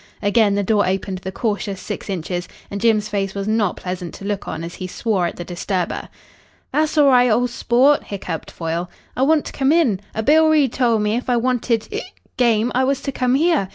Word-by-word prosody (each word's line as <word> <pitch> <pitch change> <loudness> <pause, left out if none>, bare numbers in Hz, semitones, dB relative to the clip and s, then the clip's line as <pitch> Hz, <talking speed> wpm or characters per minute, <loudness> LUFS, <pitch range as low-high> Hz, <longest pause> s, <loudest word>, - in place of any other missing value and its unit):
Again 205 0 +3
the 200 - +1
door 205 -1 +2
opened 190 0 -2
the 190 +1 -6
cautious 205 -2 -2
six - - -6
inches, 175 -1 -3 0.2
and 200 0 -4
Jim's 215 -2 +3
face 195 -2 -2
was 200 0 -3
not 215 -4 +1
pleasant 180 -2 -5
to 195 - -9
look 205 -1 -3
on 160 - -4
as 170 +1 -6
he 185 - -6
swore 190 -2 0
at - - -6
the 175 - -7
disturber. 180 0 -3 0.6
"Tha'ss 310 +1 +1
allri', 255 -4 +6
ol' 245 +3 +3
sport," 250 +4 +2
hiccoughed 180 -5 -5
Foyle. 170 +1 -3 0.3
"I - - -2
want 300 +2 +3
to - - -7
come 270 0 +2
in. 295 - +3 0.2
A 220 - -1
Bill 315 +5 +5
Reid 295 -6 +3
tol' 240 -3 +2
me 210 +1 0
if 250 - -4
I 245 - +3
wanted 240 -2 0
hic 435 +3 -6 0.2
game 235 -1 +2
I 255 - +2
was 275 +1 +1
to 275 - -2
come 255 -1 +1
here. 310 - +2
220 Hz, 215 wpm, -20 LUFS, 190-255 Hz, 0.6 s, allri